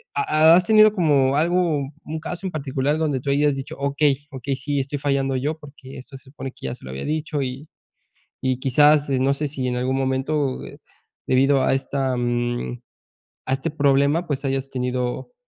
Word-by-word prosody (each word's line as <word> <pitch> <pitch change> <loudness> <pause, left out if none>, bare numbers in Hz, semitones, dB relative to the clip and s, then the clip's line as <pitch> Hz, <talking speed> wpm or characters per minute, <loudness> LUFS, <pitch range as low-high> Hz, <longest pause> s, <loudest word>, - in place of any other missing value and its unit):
¿ha 155 +3 +5
has 180 +1 +3
tenido 215 -1 +7
como 145 -7 +2
algo 165 -3 +1 0.2
un 160 +1 -4
caso 175 +4 -6
en - - -5
particular 140 -1 -1
donde 150 -5 -1
tú 140 - -4
hayas 145 0 +2
dicho: 135 0 -7
"Okey, 140 0 0
okey. 135 0 -3
Sí, 140 +1 -2
estoy 135 +2 -3
fallando 135 -1 0
yo, 150 +5 -2
porque 140 -3 -12
eso 135 +2 -10
se 130 - -19
supone 135 -1 -8
que - - -12
ya 65 - -4
se - - -19
lo 65 - -7
había 65 +1 -6
dicho", 155 -1 -2
y 135 +3 -5 0.7
y 130 -1 0
quizás 145 +3 +4
no 135 +1 +2
sé 150 +2 -2
si 135 -2 -4
en 125 - -2
algún 130 +1 -1
momento, 135 +1 -1
eh, - - -11 0.5
debido 135 +1 +3
a - - +2
esta 135 -1 -1
mm, 120 0 -2 0.7
a 130 - 0
este 135 +1 -2
problema, 140 +3 +2
pues 145 -2 -3
hayas 135 0 -2
tenido 125 - -3
140 Hz, 190 wpm, -22 LUFS, 130-150 Hz, 0.7 s, tenido